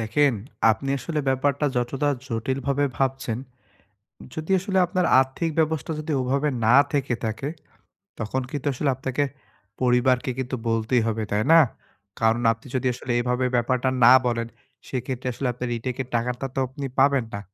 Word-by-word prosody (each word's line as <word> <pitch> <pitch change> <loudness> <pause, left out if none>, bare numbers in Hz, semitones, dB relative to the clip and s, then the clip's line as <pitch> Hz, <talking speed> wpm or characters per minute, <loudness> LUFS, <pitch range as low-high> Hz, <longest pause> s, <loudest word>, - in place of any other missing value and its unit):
দেখেন, 130 +6 +2 0.4
আপনি 110 +5 -2
আসলে 150 +5 -2
ব্যাপারটা 140 +2 +1
যতটা 125 +4 0 0.2
জটিল 120 +3 -2
ভাবে 140 +1 +2
ভাবছেন, 135 -3 -1 1.0
যদি 160 +3 -6
আসলে 190 0 -1
আপনার 180 0 0
আর্থিক 135 +5 -1
ব্যবস্থা 160 0 0
যদি 155 0 -4
ওভাবে 135 +4 0 0.2
না 115 - +5 0.2
থেকে 140 -4 0
থাকে, 110 +5 -3 0.7
তখন 115 +4 -2
কিন্তু 145 0 -3
আসলে 140 +3 -1
আপনাকে 130 +2 -1 0.6
পরিবারকে 125 +1 +2
কিন্তু 130 0 -2
বলতেই 115 +2 +1
হবে। 110 0 -1
তাই 105 +1 +1
না? 165 - +9 0.6
কারণ 115 +1 +3
আপনি 115 +3 -7
যদি 130 0 0
আসলে 125 +1 -5
এভাবে 125 +1 0
ব্যাপারটা 125 +2 +1
না 120 - +9
বলেন, 115 -1 0 0.4
সেক্ষেত্রে 130 0 -4
আসলে 130 +2 -3
আপনার 125 +1 -4
রিটেকের 125 +2 -4
টাকাটা 125 +3 -1
তো 135 - 0
আপনি 135 +2 -7
পাবেন 140 -3 +4
না। 100 - -3
130 Hz, 155 wpm, -24 LUFS, 120-140 Hz, 1.0 s, না